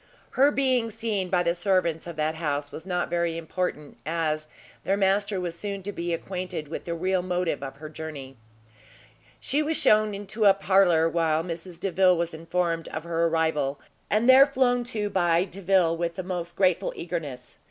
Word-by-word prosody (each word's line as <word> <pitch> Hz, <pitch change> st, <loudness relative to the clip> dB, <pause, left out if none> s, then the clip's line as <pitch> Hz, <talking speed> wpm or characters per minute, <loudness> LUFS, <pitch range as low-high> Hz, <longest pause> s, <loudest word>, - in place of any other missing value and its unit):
Her 275 Hz, +2 st, +4 dB
being 260 Hz, -5 st, +1 dB
seen 215 Hz, -4 st, -2 dB
by 180 Hz, -1 st, +2 dB
the 170 Hz, 0 st, +1 dB
servants 175 Hz, -3 st, 0 dB
of 170 Hz, -, -6 dB
that 155 Hz, 0 st, 0 dB
house 145 Hz, -3 st, -3 dB
was 160 Hz, -, -9 dB
not 180 Hz, -1 st, -1 dB
very 170 Hz, -1 st, -1 dB
important, 165 Hz, -3 st, -4 dB
as 155 Hz, -1 st, -1 dB, 0.4 s
their 195 Hz, -, +1 dB
master 200 Hz, 0 st, +2 dB
was 175 Hz, -2 st, -3 dB
soon 200 Hz, +1 st, -5 dB
to 205 Hz, -, -4 dB
be 175 Hz, -3 st, -4 dB
acquainted 180 Hz, -2 st, -4 dB
with 160 Hz, -, -6 dB
the 170 Hz, -, -3 dB
real 185 Hz, +2 st, 0 dB
motive 180 Hz, -4 st, -1 dB
of 135 Hz, -1 st, -6 dB
her 155 Hz, +3 st, -9 dB
journey. 150 Hz, -4 st, -8 dB, 1.0 s
She 290 Hz, +3 st, 0 dB
was 310 Hz, +1 st, 0 dB
shewn 215 Hz, -1 st, +3 dB
into 205 Hz, +2 st, -2 dB
a 195 Hz, -1 st, +7 dB
parlour, 185 Hz, -4 st, +4 dB
while 165 Hz, -1 st, +1 dB
Mrs 170 Hz, 0 st, -7 dB
Delvile 185 Hz, -1 st, +3 dB
was 170 Hz, 0 st, -2 dB
informed 165 Hz, +1 st, -2 dB
of 160 Hz, -, -5 dB
her 170 Hz, 0 st, 0 dB
arrival, 160 Hz, -4 st, 0 dB, 0.3 s
and 215 Hz, +3 st, +2 dB
there 265 Hz, +2 st, +8 dB
flown 250 Hz, -3 st, +2 dB
to 210 Hz, -4 st, -2 dB
by 175 Hz, -2 st, +3 dB
Delvile 185 Hz, -2 st, +1 dB
with 170 Hz, 0 st, -2 dB
the 185 Hz, -, -4 dB
most 175 Hz, -2 st, -5 dB
grateful 185 Hz, -3 st, +2 dB
eagerness. 150 Hz, -8 st, -6 dB
175 Hz, 180 wpm, -26 LUFS, 165-195 Hz, 1.0 s, there